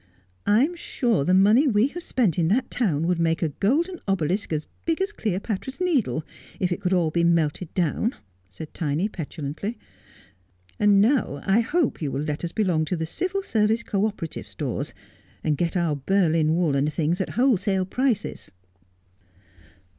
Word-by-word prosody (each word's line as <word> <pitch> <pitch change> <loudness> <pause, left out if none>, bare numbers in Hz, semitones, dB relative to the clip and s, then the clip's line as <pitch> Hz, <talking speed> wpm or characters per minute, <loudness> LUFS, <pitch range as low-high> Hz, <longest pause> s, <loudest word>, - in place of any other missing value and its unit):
' 90 0 -39
I'm 295 +9 +2
sure 240 - 0
the 180 +5 +3
money 215 +10 +5
we 225 +1 +3
have 350 - -7
spent 225 - 0
in 165 - +2
that 225 +9 +1
town 165 - 0
would 175 0 +1
make 165 0 +1
a 160 - +1
golden 310 - 0
obelisk 190 +1 0
as 155 -1 -1 0.2
big 330 0 0
as 385 +2 0
Cleopatra's 215 - -3
Needle, 260 - +1 0.4
if 180 -1 0
it 175 - -2
could 180 - -1
all 175 -4 +2
be 170 +1 +1
melted 170 0 +1
down,' 185 - 0 0.3
said 125 - -10
Tiny 160 +3 -1
petulantly; 165 +4 -5 0.5
' 90 -1 -34
and 205 -1 +5
now 230 - +1
I 195 +3 +4
hope 280 - 0
you 145 -3 -2
will 140 +2 -2
let 150 +1 -3
us 170 - -2
belong 180 -7 +1
to 180 - -2
the 160 -1 -2
Civil 370 - -2
Service 220 - +1
Co 205 0 +1
operative 185 -7 -6
Stores, - - -4 0.5
and 155 -2 +1
get 170 +4 -1
our 170 -4 +1
Berlin 160 0 +2
wool 165 -5 +1
and 140 +2 +1
things 165 +3 0
at - - -2
wholesale 200 -7 +2
prices.' 250 +3 -1
185 Hz, 175 wpm, -24 LUFS, 155-225 Hz, 0.5 s, money